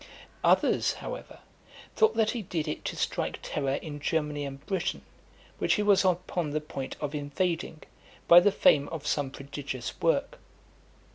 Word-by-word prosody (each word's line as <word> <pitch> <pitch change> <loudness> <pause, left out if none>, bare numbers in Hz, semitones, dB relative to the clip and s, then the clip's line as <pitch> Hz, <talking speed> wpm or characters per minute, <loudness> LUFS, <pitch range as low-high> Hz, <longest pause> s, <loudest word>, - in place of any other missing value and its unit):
Others, - - +3
however, - - -8 0.5
thought 445 0 +4
that 220 -1 +2
he 240 - -3
did 170 -5 -3
it 150 - -4
to - - -3
strike - - -2
terror 135 -2 -1
in 145 -1 -6
Germany 150 -1 -1
and 135 0 -8
Britain, 190 -2 -2 0.6
which - - +3
he 210 - 0
was 205 -2 +5
upon 180 -3 0
the 150 +1 -1
point 140 -3 -6
of 145 -1 -3
invading, 155 +2 -2 0.4
by 170 - +10
the 200 +3 +4
fame 145 -6 +4
of 155 -2 -6
some 145 -2 0
prodigious 135 -2 -6
work. - - +1
155 Hz, 155 wpm, -28 LUFS, 145-185 Hz, 0.6 s, by